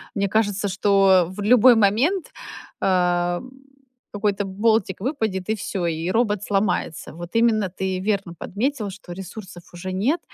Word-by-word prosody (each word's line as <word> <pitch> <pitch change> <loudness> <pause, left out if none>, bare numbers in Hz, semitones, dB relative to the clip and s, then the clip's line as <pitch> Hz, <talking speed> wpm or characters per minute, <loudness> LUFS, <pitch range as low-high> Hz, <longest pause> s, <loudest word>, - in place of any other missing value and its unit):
Мне 200 -1 +1
кажется, 205 -1 0
что 195 -2 +3
в 195 +2 -7
любой 245 +3 +6
момент, 230 - +2 0.5
а, 175 -1 +1 0.7
какой-то 205 -1 0
болтик 200 0 0
выпадет 220 - -2
и 220 - +2
всё, 190 -3 -3
и 165 +1 -2
робот 210 -2 +1
сломается. 195 -5 -1
Вот 175 +1 -8
именно 225 -4 +3
ты 190 +1 -3
верно 195 -2 -2
подметил, 220 - -3
что 190 -2 -11
ресурсов 190 0 -9
уже 175 +2 -6
нет. 245 - +1
200 Hz, 140 wpm, -22 LUFS, 185-220 Hz, 0.7 s, любой